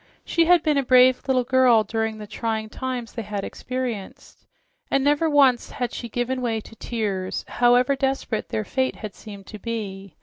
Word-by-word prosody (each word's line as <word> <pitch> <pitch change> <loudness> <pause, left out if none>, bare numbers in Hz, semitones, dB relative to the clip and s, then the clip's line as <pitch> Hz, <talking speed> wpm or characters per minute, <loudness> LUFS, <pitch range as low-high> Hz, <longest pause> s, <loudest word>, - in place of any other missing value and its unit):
She 335 -1 +2
had 350 -1 +5
been 300 -3 +2
a - - 0
brave 255 0 +5
little 255 -2 +2
girl 250 -3 +4
during 220 +1 -2
the 210 - -8
trying 220 +1 -3
times 250 -1 -5
they 230 - -4
had 205 -2 -4
experienced 250 -6 -6 0.4
and 275 - +2
never 295 +3 +2
once 275 -5 +4
had 245 -1 -3
she 235 - -6
given 245 +3 -2
way 230 -3 -1
to 225 - -13
tears, 200 -5 -3
however 245 +3 +3
desperate 270 -5 -2
their 215 - -2
fate 260 +3 -1
had 215 -3 -7
seemed 200 -3 -11
to 215 - -10
be. 200 -4 -5
240 Hz, 180 wpm, -23 LUFS, 215-260 Hz, 0.4 s, had